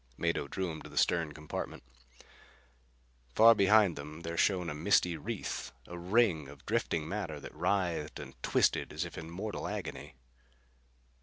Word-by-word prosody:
Mado 85 -4 0
drew 95 +3 -2
him 80 - -7
to - - -10
the - - -11
stern 85 -3 +2
compartment. 75 0 -6 1.5
Far 115 +1 +9
behind 105 -3 +5
them 75 +3 -8
there 85 0 -4
shone 90 0 +2
a 80 - -2
misty 85 +2 +3
wreath, 75 - -4
a 85 - -8
ring 90 - +2
of 70 0 -13
drifting 80 -2 0
matter 90 -6 -3
that - - -9
writhed 85 -2 -1
and 65 - -8
twisted - - +2
as 80 +3 -2
if 85 - -8
in 80 0 -7
mortal 100 +5 -4
agony. - - -5
85 Hz, 155 wpm, -32 LUFS, 75-95 Hz, 1.5 s, Far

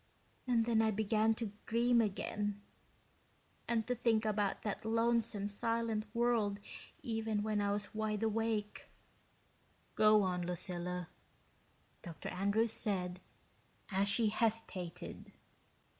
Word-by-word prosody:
And 235 -2 +3
then 225 -1 +3
I 220 - +3
began 220 +1 +2
to 220 -2 -4 0.2
dream 235 +1 +4
again, 205 0 -2 1.1
and 230 -2 +1
to 250 - 0
think 230 -2 +2
about 205 -2 0
that 210 -2 -3
lonesome 230 -2 +1
silent 225 +1 0
world 230 -4 +2 0.4
even 220 -2 -1
when 215 -1 0
I 200 0 +1
was 205 0 -2
wide 215 0 -1
awake." 220 -1 -1 1.1
"Go 215 -1 +5
on, 180 -1 0
Lucilla," 180 0 -3 0.9
Dr. 165 -4 -7
Andrews 200 +5 +1
said, 180 -4 -1 0.7
as 195 +1 +2
she 220 +2 +3
hesitated. 215 -6 -2
215 Hz, 115 wpm, -35 LUFS, 200-225 Hz, 1.1 s, Go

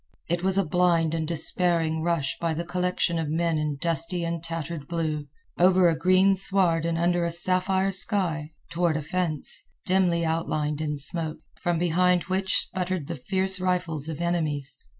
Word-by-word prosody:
It 175 0 -1
was 190 +1 +1
a 195 - +2
blind 170 -1 +1
and 160 -1 -2
despairing 165 0 0
rush 160 -5 -1
by 165 -2 -1
the 170 - -3
collection 180 -1 -1
of 160 -2 -3
men 165 0 0
in 150 -1 -2
dusty 165 +2 -1
and 170 -1 -4
tattered 165 -2 -5
blue, 155 -3 -3 0.3
over 185 0 +5
a 165 - +2
green 185 +4 +3
sward 185 -4 +3
and 170 0 -1
under 175 +1 +1
a 170 - 0
sapphire 185 +3 0
sky, 185 -6 +1 0.2
toward 170 -2 0
a 155 - -4
fence, 165 -2 -1 0.2
dimly 180 -3 +1
outlined 155 -2 -2
in 150 -1 -3
smoke, 155 +2 +5 0.2
from 175 -1 -1
behind 180 +1 +2
which 190 0 0
sputtered 185 -4 -3
the - - -5
fierce 190 +6 0
rifles 175 -5 -2
of 160 0 -6
enemies. 155 -5 -2
170 Hz, 170 wpm, -25 LUFS, 160-180 Hz, 0.3 s, over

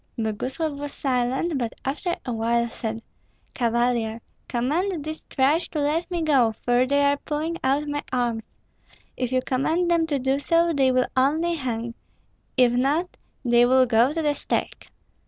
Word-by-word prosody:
Boguslav 260 +7 -2
was 290 0 -5
silent, 265 +4 0
but 235 -2 -2
after 325 +6 -1
a 245 - -2
while 235 +1 +1
said, 225 0 -5 0.5
"Cavalier, 235 -2 0 0.3
command 300 +7 -1
these 310 0 -6
trash 290 +5 +1
to 310 - -3
let 305 +5 0
me 345 -2 -2
go, 260 -8 +3
for 245 +3 +1
they 285 +1 +2
are 285 0 +3
pulling 310 +4 -3
out 280 +3 +1
my 290 0 -2
arms. 240 -3 0 0.7
If 250 -1 -2
you 255 0 +1
command 325 +7 +1
them 330 -1 +2
to 290 -3 0
do 265 +1 0
so, 335 +3 +2
they 265 -2 +3
will 255 0 +2
only 310 +6 +2
hang; 235 -6 -3 0.6
if 250 -2 +5
not, 290 +9 0 0.3
they 240 0 +5
will 260 +1 +5
go 235 +2 +3
to 325 +1 -2
the 295 -1 +2
stake." - - -3
265 Hz, 165 wpm, -24 LUFS, 245-310 Hz, 0.7 s, if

